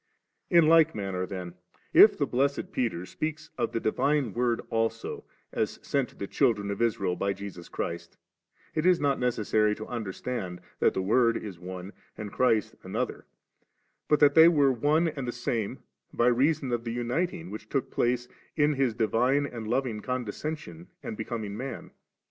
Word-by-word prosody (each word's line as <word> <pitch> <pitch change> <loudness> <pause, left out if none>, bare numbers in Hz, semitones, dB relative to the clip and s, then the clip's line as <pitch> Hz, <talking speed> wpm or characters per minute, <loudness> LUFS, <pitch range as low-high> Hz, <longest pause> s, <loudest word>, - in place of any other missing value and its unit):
In 170 -2 +6
like 160 0 +5
manner 95 -3 -3
then, 90 -3 -6 0.4
if - - +8
the - - +1
blessed 140 +3 0
Peter 110 -9 -1
speak 155 - -3 0.2
of - - -1
the 115 - -1
Divine 135 +1 +1
Word 120 -1 +1
also, 115 0 -2 0.3
as - - -1
sent 140 -3 0
to - - -20
the 100 - -5
children 100 0 +1
of 100 - -4
Israel 100 -6 +1
by 100 +1 -1
Jesus 95 -3 -9
Christ, 85 0 -5 0.6
it 155 - 0
Is 180 0 +5
BOt 145 -2 +1
necessary 110 -3 +1
to 110 - -7
understand 105 -4 -4 0.2
that - - +3
the 95 - 0
Word 115 +3 +3
is 95 -5 -7
one 90 +2 -7 0.2
and 105 -1 -6
Christ 115 -5 +2
another, - - -4 0.8
but 150 - +3
that 145 -1 +7
they 160 +2 +9
were 145 -5 +4
one 150 +7 +2
and 140 -5 -4
the - - -1
same 120 -3 -3 0.3
by 120 - +1
reason 135 +2 +2
of 120 -1 -1
the 115 -1 -4
uniting 120 - -2
which 110 0 -8
took 135 - -1
place 120 0 0 0.3
in 150 -1 +3
His 135 -5 +1
divine 125 +5 +2
and 115 -5 -6
loving 120 -2 -1
condescension 125 - -5 0.2
and 110 - -5
becoming 110 -2 -4
man. 130 +2 -6
120 Hz, 170 wpm, -28 LUFS, 105-140 Hz, 0.8 s, they